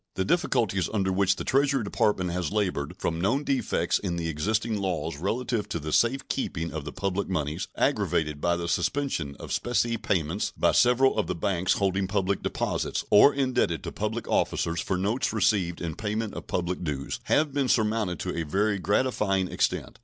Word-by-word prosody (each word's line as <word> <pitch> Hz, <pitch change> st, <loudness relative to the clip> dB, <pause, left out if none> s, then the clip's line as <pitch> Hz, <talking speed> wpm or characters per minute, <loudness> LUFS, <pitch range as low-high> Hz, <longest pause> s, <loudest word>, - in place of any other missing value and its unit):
The 95 Hz, -, 0 dB
difficulties 120 Hz, -, +1 dB
under 95 Hz, -3 st, 0 dB
which 95 Hz, 0 st, +2 dB
the -, -, -5 dB
Treasury 135 Hz, -2 st, +2 dB
Department 100 Hz, -3 st, 0 dB
has 90 Hz, -1 st, -2 dB
labored, 95 Hz, -9 st, -1 dB
from 80 Hz, 0 st, -2 dB
known 120 Hz, +10 st, +1 dB
defects 135 Hz, -2 st, 0 dB
in 90 Hz, -4 st, -2 dB
the 85 Hz, -1 st, -2 dB
existing 110 Hz, +8 st, -1 dB
laws 85 Hz, -5 st, -2 dB
relative 110 Hz, +4 st, -2 dB
to 85 Hz, -, -2 dB
the 75 Hz, 0 st, -4 dB
safe 135 Hz, +3 st, +2 dB
keeping 85 Hz, -, -3 dB
of 80 Hz, -2 st, -5 dB
the 75 Hz, -, -5 dB
public 95 Hz, +1 st, -2 dB
moneys, 75 Hz, -4 st, -2 dB
aggravated 75 Hz, -2 st, 0 dB
by 85 Hz, 0 st, +2 dB
the 85 Hz, 0 st, -3 dB
suspension 85 Hz, -, -1 dB
of -, -, -8 dB
specie 120 Hz, -1 st, 0 dB
payments 95 Hz, -4 st, -1 dB
by -, -, +3 dB
several 125 Hz, 0 st, +4 dB
of -, -, 0 dB
the -, -, -2 dB
banks 90 Hz, +1 st, +1 dB
holding 95 Hz, -1 st, 0 dB
public 100 Hz, 0 st, 0 dB
deposits -, -, -2 dB
or 105 Hz, +7 st, +8 dB
indebted 130 Hz, -, 0 dB
to -, -, -5 dB
public 110 Hz, +2 st, -3 dB
officers 85 Hz, 0 st, 0 dB
for 95 Hz, -, -1 dB
notes 105 Hz, +7 st, 0 dB
received 95 Hz, -5 st, +1 dB
in 85 Hz, -2 st, -3 dB
payment 105 Hz, 0 st, -3 dB
of -, -, -8 dB
public 90 Hz, 0 st, -2 dB
dues, 70 Hz, -4 st, -3 dB
have 150 Hz, -2 st, +2 dB
been 140 Hz, -2 st, +1 dB
surmounted 110 Hz, -7 st, +1 dB
to -, -, -3 dB
a 85 Hz, -, -1 dB
very 100 Hz, +6 st, 0 dB
gratifying 100 Hz, -2 st, +1 dB
extent. 105 Hz, -, -1 dB
100 Hz, 185 wpm, -27 LUFS, 85-115 Hz, -, or